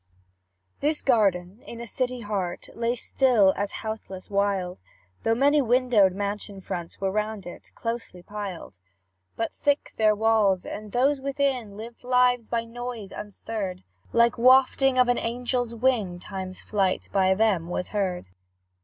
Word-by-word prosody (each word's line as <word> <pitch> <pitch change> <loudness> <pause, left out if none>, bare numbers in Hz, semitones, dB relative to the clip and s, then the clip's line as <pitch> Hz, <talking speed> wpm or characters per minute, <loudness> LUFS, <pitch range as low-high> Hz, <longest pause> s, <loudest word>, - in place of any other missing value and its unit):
This 300 +1 +1
garden, 200 -4 +2
in 235 - -8
a 235 - -5
city 250 +2 -2
heart, 200 -5 -3
Lay 235 +1 -1
still 235 -5 +3
as 200 +1 -2
houseless 210 -3 -6
wild, 195 -3 0 0.4
Though 225 - +2
many 285 +4 +4
windowed 240 -6 +4
mansion 200 0 -4
fronts 175 -2 -6
Were 195 -1 0
round 210 -1 -2
it; 175 - -10
closely 230 -6 -5
piled; 195 - -7 0.6
But 225 - -2
thick 285 0 0
their 215 -1 +4
walls, 210 -4 +2
and 210 -1 -7
those 270 +4 +2
within 265 -6 -1
Lived 230 +3 -9
lives 250 -2 +3
by 230 -1 -1
noise 235 -3 -6
unstirred; 205 -2 -5 0.3
Like 235 0 +3
wafting 260 +1 +5
of 250 -1 +5
an 245 - +2
angel's 245 0 -2
wing, 225 -7 +1
Time's 185 0 -7
flight 195 -3 0
by 190 -1 +4
them 190 -6 +1
was 180 - -3
heard. 190 - -1
220 Hz, 145 wpm, -26 LUFS, 195-245 Hz, 0.6 s, wafting